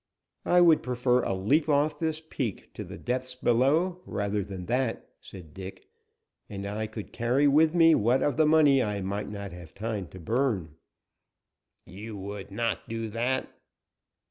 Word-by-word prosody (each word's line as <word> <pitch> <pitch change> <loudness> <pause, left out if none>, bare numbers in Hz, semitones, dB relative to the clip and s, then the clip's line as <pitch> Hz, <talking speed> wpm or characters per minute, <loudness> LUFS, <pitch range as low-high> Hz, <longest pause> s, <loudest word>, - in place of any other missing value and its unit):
"I 180 0 +5
would 165 -3 +6
prefer 125 0 +1
a - - -1
leap 145 +12 +1
off 150 +1 +2
this 160 -1 -1
peak 120 - -4
to - - -6
the - - -9
depths 130 +1 -2
below, 145 +10 +2
rather 100 0 -1
than 95 -2 -7
that," 125 +1 -1
said 85 -6 -12
Dick, 95 +1 -9 0.6
"and 100 -1 -6
I 105 +2 -3
could 110 -1 -8
carry 125 +5 +2
with 155 +3 +4
me 165 -1 +6
what 120 +1 +2
of 145 - +1
the 155 0 +3
money 150 -4 +5
I 105 -3 -2
might 100 +2 -3
not 100 -1 -6
have 85 -2 -12
time 105 -3 -4
to 90 +5 -12
burn." 105 - -1 1.1
"You 105 +3 -8
would 100 0 -7
not 115 +3 -2
do 115 0 -3
that." 120 +4 -1
115 Hz, 165 wpm, -28 LUFS, 100-140 Hz, 1.1 s, would